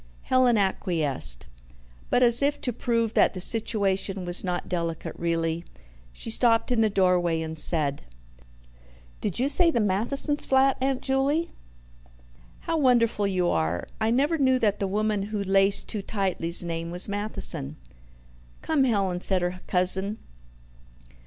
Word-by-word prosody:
Helen 255 -3 +3
acquiesced. 160 - 0 0.6
But, 250 - +3
as 240 +1 +4
if 285 +1 +1
to 245 - -2
prove 230 -1 -1
that - - +3
the - - -5
situation 195 -2 -1
was 175 0 +1
not 180 -2 -3
delicate 170 -2 -4
really, 165 0 -2 0.5
she 140 - -6
stopped 230 +1 +3
in 235 -2 +2
the 220 - +3
doorway 180 -4 +1
and 160 0 -6
said: 150 -3 +1 1.2
"Did 205 - -3
you 255 - +1
say 335 +4 +3
the 275 - 0
Mathesons' 230 +9 0
flat, 265 0 +3
Aunt 265 -1 -1
Juley? 280 +5 0 1.1
How 330 -1 -2
wonderful 235 -6 +2
you 185 -2 0
are! 80 +2 -1
I 220 0 +1
never 290 +7 +1
knew 260 -2 +3
that 210 -4 0
the 195 - -1
woman 210 +1 -1
who 205 0 -3
laced 195 +1 +2
too 210 - -3
tightly's 185 -4 +1
name 165 -1 -4
was 175 +1 0
Matheson." 205 - -3 0.9
"Come, 305 -4 +1
Helen," 195 -7 0
said 185 -2 +3
her 180 +1 -3
cousin. 190 +3 +1
200 Hz, 145 wpm, -25 LUFS, 180-245 Hz, 1.2 s, as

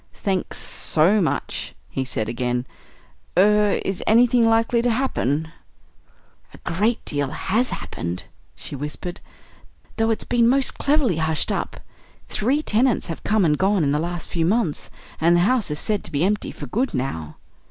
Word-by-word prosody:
"Thanks 190 -3 -2
so 180 +7 +2
much," 145 -5 -2
he 135 - -3
said 120 -4 -3
again. 125 +1 -2 0.7
"Er 210 +1 +4
is 195 -1 -2
anything 240 +2 +5
likely 225 +1 +3
to 245 - +1
happen?" 160 - 0 1.0
"A - - -13
great 210 +7 0
deal 145 -2 +1
has 225 - 0
happened," 85 +2 -4 0.3
she - - -7
whispered, 150 +5 -5 0.8
"though 225 0 +2
it's 225 - 0
been 235 -1 +3
most 270 0 +1
cleverly 280 - +2
hushed 160 -1 0
up. - - -3 0.5
Three 270 +8 +1
tenants 240 +1 +2
have - - -13
come 215 -3 +2
and 150 -2 +3
gone 195 -2 +2
in 140 - +1
the 150 - +1
last 175 +1 -4
few 165 - -1
months, 185 -3 0 0.3
and 170 +2 +4
the 175 - +4
house 220 +1 +2
is 150 - -2
said 210 +5 0
to - - -3
be 145 +2 0
empty 205 +2 -1
for - - -8
good 250 - -1
now." 80 - -3
190 Hz, 165 wpm, -22 LUFS, 150-230 Hz, 1.0 s, anything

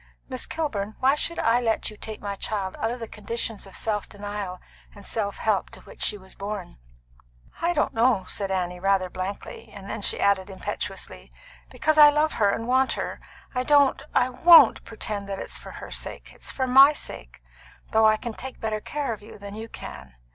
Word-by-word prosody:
Miss 255 -2 -3
Kilburn, 220 -10 -3
why 265 +1 +4
should 335 +3 -2
I 235 +2 +3
let 225 -2 0
you - - -11
take 215 0 -6
my 200 -1 -3
child 195 -2 -3
out 225 - 0
of 245 +2 -4
the 230 - -5
conditions 215 -1 -5
of 195 - -12
self 210 -2 -1
denial 205 -3 -5 0.4
and 200 -1 -13
self 205 -3 -1
help 215 -3 0
to - - -13
which - - -14
she 210 - 0
was 190 -1 -13
born?" 200 - -6 0.8
"I 345 +1 +2
don't 305 - +1
know," 225 -4 +3
said 200 -2 -3
Annie 180 -2 -2
rather 190 -1 +1
blankly. 190 +2 -6
Then 200 +2 -6
she - - +1
added 200 -1 +2
impetuously: 190 - -6 0.4
"Because 310 0 +1
I 295 0 +11
love 300 +1 +2
her 205 - +5
and 230 - -1
want 260 +1 +3
her. - - -4 0.3
I 250 - 0
don't 285 +1 +4
I 250 - +4
won't 330 +6 +7
pretend 210 -3 -4
that 195 - -3
it's - - -5
for - - -10
her - - -9
sake. - - -3
It's - - -5
for 260 - -1
my 270 +3 +8
sake, - - -6 0.5
though 220 -1 +5
I 215 0 +4
can 235 0 -5
take 260 +3 -8
better 215 -1 -2
care 285 -2 -3
of 210 - -9
her 210 - -12
than 200 0 -9
you 220 +2 -7
can. 70 - -9
215 Hz, 200 wpm, -25 LUFS, 200-255 Hz, 0.8 s, I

